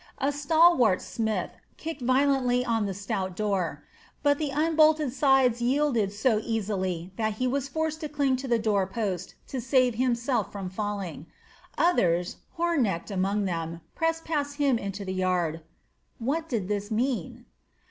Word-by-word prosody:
A 275 +1 +1
stalwart 290 - +4
smith 220 -2 -2 0.3
kicked 315 -3 -6
violently 255 -1 +2
on 225 -4 +1
the 195 - -3
stout 190 -2 -3
door; 185 -8 -1 0.4
but 285 -1 +3
the 300 -2 -1
unbolted 310 -2 +3
sides 265 -4 +3
yielded 245 -5 +2
so 215 +1 +1
easily 190 -5 -2
that 220 -1 0
he 255 +5 -2
was 270 +2 0
forced 315 +3 -2
to 305 - -4
cling 280 -3 +1
to 265 +1 -6
the 240 -2 +3
door 210 -4 +1
post 195 -3 -3
to 260 - -3
save 255 0 +3
himself 240 -2 0
from 195 -3 -5
falling. 195 -6 -4 0.5
Others, 180 - +2 0.2
Hornecht 265 - 0
among 195 +2 0
them, 165 -2 -3
pressed 325 0 -1
past 290 -3 -1
him 280 -5 +2
into 200 0 -5
the 185 - -3
yard. 180 -3 0 0.6
What 310 +7 -2
did 215 -7 -1
this 205 0 -2
mean? 230 - -2
235 Hz, 150 wpm, -27 LUFS, 195-280 Hz, 0.6 s, stalwart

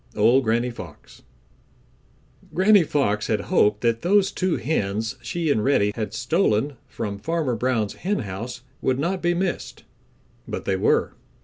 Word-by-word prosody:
—Old 120 +6 +4
Granny 120 +2 +1
Fox. 90 -10 -12 1.3
Granny 200 +2 +6
Fox 105 -9 0
had 110 - +1
hoped 105 0 +3
that 115 -1 +1
those 195 +3 +3
two 185 -2 0
hens 110 -6 -1
she 170 -3 -1
and 110 - +1
Reddy 105 -7 +3
had 110 -3 -3
stolen 130 - +1
from 100 -2 -5
Farmer 155 -1 -1
Brown's 115 -3 0
henhouse 120 - -4 0.2
would 130 -1 +1
not 175 +6 -1
be 175 0 +1
missed, 180 0 -3 0.6
but - - -5
they 95 - +1
were. 95 - +2
125 Hz, 140 wpm, -23 LUFS, 105-170 Hz, 1.3 s, Granny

